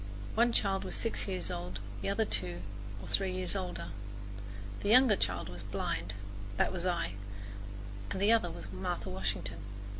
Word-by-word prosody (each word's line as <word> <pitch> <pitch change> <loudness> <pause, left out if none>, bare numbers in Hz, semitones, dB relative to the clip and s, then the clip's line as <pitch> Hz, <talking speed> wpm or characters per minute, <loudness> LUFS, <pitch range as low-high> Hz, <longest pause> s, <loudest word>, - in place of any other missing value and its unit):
One 235 +2 +5
child 195 -4 +2
was - - -2
six 230 - +1
years 185 -2 -1
old, 90 +2 -3 0.2
the - - 0
other 220 +3 +3
two 90 - -1 0.4
or - - -7
three 195 -1 +3
years 185 +1 0
older. 180 - -2 0.9
The 200 - 0
younger 250 -1 +9
child 95 - 0
was 90 0 -6
blind 95 -1 -1 0.4
that - - +3
was 180 0 0
I 170 - +1 1.0
and 185 - -1
the 205 +3 +6
other 225 -6 +5
was 95 -10 -6
Martha 95 0 -2
Washington. 95 +2 -1
175 Hz, 160 wpm, -34 LUFS, -, 1.0 s, younger